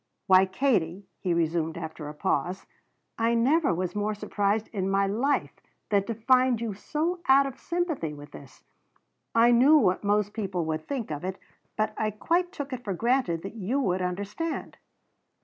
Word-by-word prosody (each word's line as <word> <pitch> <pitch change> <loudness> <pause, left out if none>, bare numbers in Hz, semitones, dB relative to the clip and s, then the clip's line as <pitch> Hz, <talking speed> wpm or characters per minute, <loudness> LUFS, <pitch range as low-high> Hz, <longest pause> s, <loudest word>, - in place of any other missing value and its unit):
"Why, 190 0 +6
Katie," 190 -4 0
he 185 - -1
resumed 165 -1 0
after 160 -2 -6
a 150 - -9
pause, 175 +6 -1 0.5
"I 230 +1 +2
never 280 +7 +3
was 180 +1 -2
more 210 +1 -1
surprised 210 +1 -1
in 195 -3 -2
my 195 0 +2
life 240 +9 0 0.4
than 200 -2 +2
to 230 - -3
find 255 +1 +3
you 225 -3 -3
so 315 - -2
out 275 +1 +6
of 270 -1 -6
sympathy 340 - -2
with 145 0 -11
this. 140 -2 -13 0.7
I 230 +1 +6
knew 265 +6 +6
what 190 -9 +2
most 205 0 +1
people 190 -6 -2
would 155 0 -3
think 255 - -3
of 150 +1 -4
it, 185 +1 -3 0.4
but 215 0 0
I 215 - 0
quite 340 - 0
took 285 -7 -6
it 250 -1 -5
for 195 -5 -3
granted 230 -7 +1
that 195 - -6
you 230 +5 -1
would 185 -8 0
understand." 200 - -4
210 Hz, 175 wpm, -27 LUFS, 180-255 Hz, 0.7 s, Why